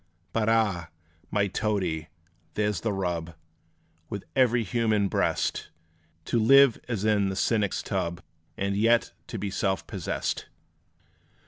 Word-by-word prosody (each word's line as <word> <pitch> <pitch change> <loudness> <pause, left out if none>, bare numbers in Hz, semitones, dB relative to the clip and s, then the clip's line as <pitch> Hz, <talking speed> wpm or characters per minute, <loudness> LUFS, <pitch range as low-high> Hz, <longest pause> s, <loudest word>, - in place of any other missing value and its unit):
But 110 -1 +1
ah! 100 -7 +1 0.4
my 105 -1 +2
Toadie, 95 -6 -1 0.5
there 105 0 +1
's 90 - -3
the 110 - 0
rub, 85 -4 -2 0.7
With 100 - -5
every 125 -3 +4
human 110 0 +1
breast - - 0 0.6
To 120 - +1
live 135 +2 +6
as 110 -4 -2
in 105 -2 +3
the 95 - -3
cynic's 105 -1 +1
tub, 85 0 -2 0.3
And 100 0 -1
yet 115 +3 +3 0.3
be 100 -1 -3
self 95 -1 -1
possessed! - - -3
105 Hz, 125 wpm, -27 LUFS, 95-115 Hz, 0.7 s, live